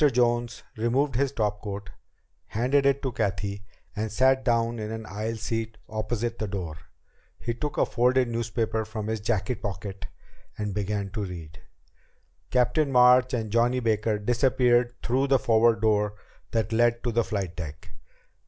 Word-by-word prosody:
Jones 120 Hz, -1 st, +1 dB
removed 130 Hz, +5 st, +1 dB
his 135 Hz, +3 st, +1 dB
topcoat, 105 Hz, -3 st, -3 dB, 0.6 s
handed 135 Hz, +5 st, +2 dB
it 140 Hz, +1 st, +2 dB
to 130 Hz, -, -1 dB
Cathy, 100 Hz, -2 st, -2 dB, 0.3 s
and 110 Hz, +1 st, -2 dB
sat 130 Hz, +4 st, +3 dB
down 115 Hz, -1 st, +1 dB
in 105 Hz, 0 st, -4 dB
an 110 Hz, 0 st, -5 dB
aisle 105 Hz, +3 st, -3 dB
seat 115 Hz, 0 st, -3 dB
opposite 115 Hz, +2 st, -3 dB
the 110 Hz, -, -2 dB
door. 90 Hz, -6 st, -4 dB, 0.6 s
He 120 Hz, -, -3 dB
took 150 Hz, +5 st, -4 dB
a -, -, +4 dB
folded 125 Hz, +1 st, +2 dB
newspaper 115 Hz, -1 st, -1 dB
from 110 Hz, -1 st, -5 dB
his 110 Hz, 0 st, -2 dB
jacket 105 Hz, +1 st, -1 dB
pocket 95 Hz, -2 st, -5 dB, 0.5 s
and 105 Hz, -2 st, -3 dB
began 100 Hz, 0 st, -2 dB
to 105 Hz, +1 st, -3 dB
read. 80 Hz, -5 st, -9 dB, 0.9 s
Captain 135 Hz, +4 st, +2 dB
March 125 Hz, 0 st, +6 dB
and 110 Hz, -3 st, -3 dB
Johnny 120 Hz, +3 st, +3 dB
Baker 110 Hz, -2 st, +1 dB
disappeared 120 Hz, +2 st, +2 dB
through 130 Hz, +3 st, +1 dB
the 135 Hz, 0 st, +5 dB
forward 115 Hz, -1 st, +3 dB
door 105 Hz, -1 st, +2 dB, 0.3 s
that 115 Hz, -1 st, -1 dB
led 120 Hz, +1 st, +3 dB
to 120 Hz, -, 0 dB
the 115 Hz, +1 st, +2 dB
flight 100 Hz, -6 st, -3 dB
deck. 80 Hz, 0 st, -7 dB
115 Hz, 155 wpm, -26 LUFS, 105-120 Hz, 0.9 s, March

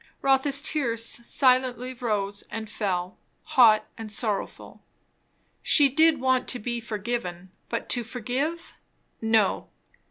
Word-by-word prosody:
Rotha's 275 Hz, +1 st, +2 dB
tears 235 Hz, -7 st, 0 dB
silently 255 Hz, +1 st, +1 dB
rose 210 Hz, -5 st, -2 dB
and 220 Hz, -1 st, -6 dB
fell, 185 Hz, -4 st, -3 dB, 0.2 s
hot 225 Hz, -4 st, +5 dB
and 220 Hz, -1 st, -5 dB
sorrowful. 210 Hz, -2 st, -2 dB, 0.8 s
She 290 Hz, -3 st, +5 dB
did 315 Hz, +2 st, +3 dB
want 260 Hz, 0 st, +1 dB
to 250 Hz, -, +1 dB
be 240 Hz, +1 st, -4 dB
forgiven; 205 Hz, -5 st, -5 dB, 0.2 s
but 230 Hz, -, -3 dB
to 245 Hz, -, +1 dB
forgive, 255 Hz, +9 st, -4 dB, 0.5 s
no. 220 Hz, -3 st, +1 dB
235 Hz, 115 wpm, -26 LUFS, 215-260 Hz, 0.8 s, hot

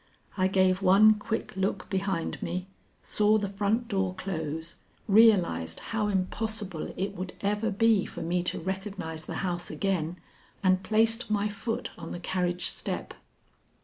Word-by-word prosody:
I 185 Hz, -1 st, +2 dB
gave 185 Hz, 0 st, +3 dB
one 200 Hz, +3 st, +7 dB
quick 215 Hz, 0 st, -4 dB
look 190 Hz, 0 st, -1 dB
behind 190 Hz, -3 st, -1 dB
me, 180 Hz, 0 st, -3 dB, 0.4 s
saw 210 Hz, +1 st, +3 dB
the 205 Hz, -1 st, -1 dB
front 205 Hz, +4 st, 0 dB
door 190 Hz, -4 st, -1 dB
close, 160 Hz, -4 st, -4 dB, 0.3 s
realized 195 Hz, -, +4 dB
how 220 Hz, -2 st, -2 dB
impossible 200 Hz, -2 st, -2 dB
it 195 Hz, +2 st, -2 dB
would 185 Hz, 0 st, -5 dB
ever 210 Hz, +2 st, 0 dB
be 220 Hz, 0 st, +3 dB
for -, -, -6 dB
me 175 Hz, +2 st, 0 dB
to -, -, 0 dB
recognize 190 Hz, -3 st, -5 dB
the -, -, -5 dB
house 175 Hz, -1 st, -2 dB
again, 180 Hz, -4 st, -1 dB, 0.5 s
and 185 Hz, -1 st, +4 dB
placed 225 Hz, +3 st, +2 dB
my 210 Hz, -1 st, +1 dB
foot 225 Hz, +4 st, -4 dB
on -, -, -6 dB
the 175 Hz, -, -5 dB
carriage 180 Hz, 0 st, -1 dB
step. -, -, -3 dB
195 Hz, 145 wpm, -28 LUFS, 180-210 Hz, 0.5 s, one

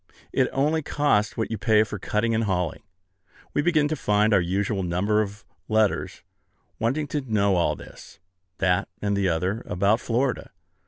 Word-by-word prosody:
It -, -, +2 dB
only 150 Hz, +4 st, +1 dB
costs 145 Hz, -8 st, +1 dB
what 115 Hz, -, -2 dB
you 110 Hz, -, -3 dB
pay 110 Hz, -1 st, +4 dB
for 105 Hz, -1 st, -6 dB
cutting 110 Hz, +4 st, 0 dB
and 110 Hz, 0 st, +1 dB
hauling. 90 Hz, -4 st, -1 dB, 0.7 s
We -, -, +2 dB
begin 155 Hz, -2 st, +2 dB
to 155 Hz, -, 0 dB
find 105 Hz, -4 st, +2 dB
our 100 Hz, -, +5 dB
usual 95 Hz, +3 st, -1 dB
number 95 Hz, +5 st, +1 dB
of 105 Hz, +1 st, -6 dB, 0.2 s
letters, 110 Hz, -2 st, 0 dB, 0.6 s
wanting 135 Hz, +7 st, 0 dB
to 150 Hz, -, -1 dB
know 105 Hz, -6 st, +1 dB
all 85 Hz, -, +1 dB
this, -, -, -13 dB, 0.4 s
that, 90 Hz, +3 st, +1 dB
and 100 Hz, -1 st, 0 dB
the 100 Hz, -2 st, +1 dB
other, 90 Hz, +7 st, -1 dB
about 100 Hz, +5 st, +2 dB
Florida. 125 Hz, +3 st, -1 dB
105 Hz, 165 wpm, -25 LUFS, 100-115 Hz, 0.7 s, our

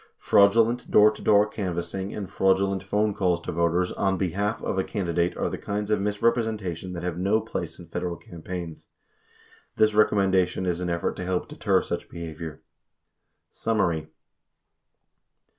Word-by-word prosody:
Fraudulent, 115 Hz, +4 st, +4 dB
door 105 Hz, +1 st, +6 dB
to -, -, -11 dB
door 105 Hz, 0 st, +5 dB
canvassing 95 Hz, -1 st, -4 dB
and 100 Hz, -2 st, -5 dB
fraudulent 95 Hz, 0 st, +1 dB
phone 105 Hz, 0 st, 0 dB
calls 90 Hz, -4 st, +1 dB
to -, -, -4 dB
voters 85 Hz, +2 st, +1 dB
"on 95 Hz, -1 st, 0 dB
behalf" 100 Hz, +4 st, -1 dB
of 95 Hz, -, -1 dB
a -, -, +2 dB
candidate 85 Hz, -4 st, -1 dB
are -, -, 0 dB
the -, -, -4 dB
kinds 105 Hz, +1 st, -3 dB
of 105 Hz, -2 st, +2 dB
misrepresentation 105 Hz, -4 st, -1 dB
that 85 Hz, -, -6 dB
have 90 Hz, -1 st, -3 dB
no 100 Hz, +4 st, +2 dB
place 110 Hz, -7 st, -5 dB
in 90 Hz, -, -11 dB
Federal 85 Hz, +1 st, -3 dB
cam 85 Hz, -1 st, -12 dB
paigns. 85 Hz, -2 st, -6 dB, 0.9 s
This 110 Hz, 0 st, +3 dB
recommendation 95 Hz, -3 st, +2 dB
is 90 Hz, -1 st, -1 dB
an 90 Hz, -1 st, -2 dB
effort 85 Hz, 0 st, -1 dB
to -, -, -4 dB
help 90 Hz, 0 st, -1 dB
deter -, -, +1 dB
such -, -, -4 dB
behavior. 80 Hz, -1 st, -7 dB, 0.9 s
Summary. 85 Hz, -9 st, 0 dB
95 Hz, 155 wpm, -26 LUFS, 85-105 Hz, 0.9 s, door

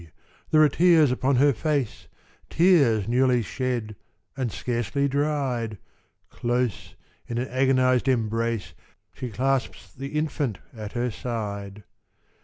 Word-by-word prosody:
There 155 Hz, 0 st, +5 dB
are -, -, +7 dB
tears 160 Hz, -2 st, +4 dB
upon 130 Hz, +2 st, +1 dB
her 140 Hz, +3 st, +4 dB
face 140 Hz, -2 st, -2 dB, 0.4 s
Tears 140 Hz, -, +4 dB
newly 125 Hz, 0 st, +3 dB
shed, 120 Hz, -3 st, -3 dB, 0.4 s
and 130 Hz, -4 st, -2 dB
scarcely 120 Hz, +7 st, -1 dB
dried: 135 Hz, -6 st, -1 dB, 0.5 s
Close, 120 Hz, -3 st, -2 dB, 0.3 s
in 120 Hz, -, -4 dB
an 125 Hz, +2 st, -1 dB
agonised 130 Hz, 0 st, +2 dB
embrace, 115 Hz, -6 st, 0 dB, 0.4 s
She 125 Hz, -, -6 dB
clasps 115 Hz, -6 st, -2 dB
the 140 Hz, +6 st, -5 dB
infant 145 Hz, -, -1 dB, 0.2 s
at 105 Hz, -2 st, -7 dB
her 120 Hz, 0 st, -1 dB
side. 105 Hz, -3 st, -5 dB
125 Hz, 115 wpm, -25 LUFS, 115-140 Hz, 0.5 s, are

